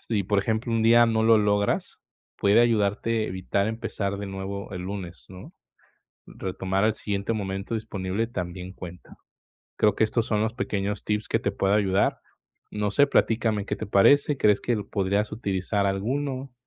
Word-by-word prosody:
si, 105 -4 -1
por 100 +2 +1
ejemplo, 110 +3 -1
un 115 -1 +1
día 120 +1 +6
no 110 -1 +1
lo 115 0 +6
logras, 105 -1 0 0.4
puede 100 +3 +4
ayudarte 110 0 +1
a - - -4
evitar 95 +2 -1
empezar 105 -3 -3
de 100 - -5
nuevo 95 +1 -6
el 90 - -5
lunes, 95 -2 -7
¿no? 95 0 -12 0.7
Retomar 95 +1 -2
al 110 0 +2
siguiente 100 +1 -2
momento 95 +1 -4
disponible 105 -1 -2
también 90 -4 -6
cuenta. 90 -2 -11 0.6
Creo 105 - +3
que - - +2
estos 110 +1 +1
son 105 -1 0
los 110 +1 -1
pequeños 100 -4 -2
tips 105 0 -2
que - - +1
te - - -1
puedo 95 +1 0
ayudar. 100 -2 +2 0.5
No 105 -1 -1
sé, 145 - +5
platícame, 110 -5 +1
¿qué - - -1
te - - -5
parece? 140 +8 +4
¿Crees 105 -4 +3
que 120 - 0
podrías 100 +1 -1
utilizar 100 -1 -1
alguno? 130 +7 -2
105 Hz, 170 wpm, -25 LUFS, 95-110 Hz, 0.7 s, día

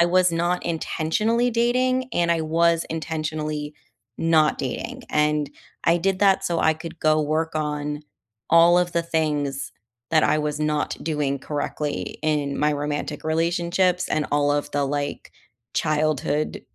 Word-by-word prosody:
I - - +7
was 180 +1 +3
not 175 +2 0
intentionally 210 +9 0
dating 255 +2 +1
and 170 -4 +1
I 165 - 0
was 165 +1 +2
intentionally 155 -1 -3 0.4
not 160 -2 +3
dating, - - -4
and 150 -1 +1 0.3
I 170 - +4
did 190 +2 0
that 195 -1 +3
so 170 -3 0
I 160 - +3
could 160 +1 -9
go 155 0 +3
work 155 +2 -1
on 150 -1 -2 0.5
all 170 +1 +7
of 175 -1 0
the 170 - +1
things 150 -4 -1 0.4
that 155 -1 +4
I - - +3
was 150 0 -2
not 150 -1 0
doing 150 -3 -1
correctly 145 +1 -4
in 145 -3 0
my 150 0 +2
romantic 145 0 -3
relationships 170 +3 +1
and 150 - 0
all 145 0 +2
of 145 0 -1
the, 145 0 +1
like, 145 +1 -3 0.4
childhood, 155 -1 0
155 Hz, 145 wpm, -23 LUFS, 150-170 Hz, 0.5 s, I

